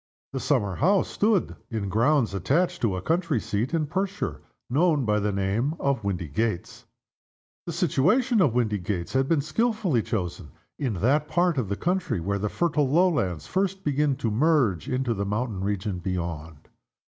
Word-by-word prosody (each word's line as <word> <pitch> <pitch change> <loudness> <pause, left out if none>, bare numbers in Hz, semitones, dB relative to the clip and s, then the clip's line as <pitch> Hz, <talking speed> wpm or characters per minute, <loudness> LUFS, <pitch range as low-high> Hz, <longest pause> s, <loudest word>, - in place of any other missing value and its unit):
The - - -2
summer 100 -3 0
house 195 +5 +3
stood 210 -3 +1
in 110 -4 -3
grounds 115 +3 +2
attached 170 - 0
to 105 -6 +1
a 95 - -5
country 165 -6 +1
seat 105 +5 -2
in 165 -2 +1
Perthshire, 190 +5 -3 0.3
known 150 0 +2
by 105 0 +2
the 105 0 0
name 100 +10 0
of 140 -5 0
Windygates. 90 +1 -2 0.8
The - - -2
situation 190 - +2
of 130 -9 +3
Windygates 105 -6 -1
had 135 0 +1
been 160 -4 +3
skillfully 200 - 0
chosen 90 - -4 0.3
in 130 -8 -1
that 140 - +2
part 175 -4 +2
of 110 -7 -2
the 100 - 0
county 180 - -1
where 100 +4 -2
the 105 +1 -1
fertile 150 -3 +1
lowlands 145 - +2
first 195 0 -1
begin 145 -1 +1
to 120 -4 -2
merge 130 - +2
into 130 -2 0
the 100 -2 -2
mountain 105 -1 -2
region 100 -1 -2
beyond. 85 -4 -5
125 Hz, 160 wpm, -26 LUFS, 100-165 Hz, 0.8 s, house